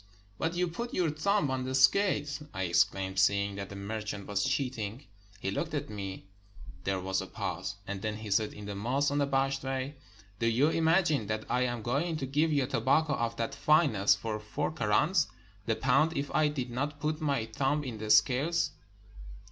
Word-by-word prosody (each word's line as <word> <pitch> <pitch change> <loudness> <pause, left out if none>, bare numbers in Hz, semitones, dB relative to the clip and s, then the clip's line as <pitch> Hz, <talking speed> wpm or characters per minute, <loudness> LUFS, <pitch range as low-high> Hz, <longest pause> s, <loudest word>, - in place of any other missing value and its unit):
"But 165 +1 -1
you 180 0 +1
put 235 +9 -5
your 170 -4 +2
thumb 155 0 +1
on 130 -1 -1
the 130 +1 -2
scales!" 145 0 +3
I 95 0 -1
ex 85 -1 +5
claimed, 95 0 -4
seeing 100 0 +3
that 100 0 -5
the 100 - -8
merchant 105 0 -5
was 100 -1 -1
cheating. 130 -3 -2 0.3
He 95 - -2
looked 155 +9 -2
at 140 - -3
me 95 -3 -6 0.3
— - - -15
there 95 -1 0
was 95 +1 -1
a - - -6
pause 95 - -4
— 100 - -29
and 100 -1 -4
then 110 0 -2
he 110 -1 -7
said, 105 +2 +2
in 105 - -9
the 100 - -4
most 130 +8 0
unabashed 135 -1 +1
way, 135 +1 -3 0.5
"Do 115 - +1
you 125 +7 +3
imagine 160 - +2
that 110 +1 -2
I 125 +1 +2
am 120 -2 -3
going 150 +8 0
to 135 - -3
give 150 +4 +1
you 140 -3 +2
tobacco 150 +4 +2
of 115 -3 -1
that 115 +4 -2
fineness 140 -10 +4
for 105 +1 -4
four 105 +7 -3
krans 150 - +2 0.4
the 115 - +2
pound 140 +7 +2
if 140 0 -3
I 155 - +4
did 130 -4 -3
not 140 +4 -3
put 155 +2 -2
my 140 -7 0
thumb 135 +6 0
in 120 -5 -6
the 110 0 -5
scale?" 125 +10 +4
130 Hz, 200 wpm, -30 LUFS, 105-150 Hz, 0.5 s, ex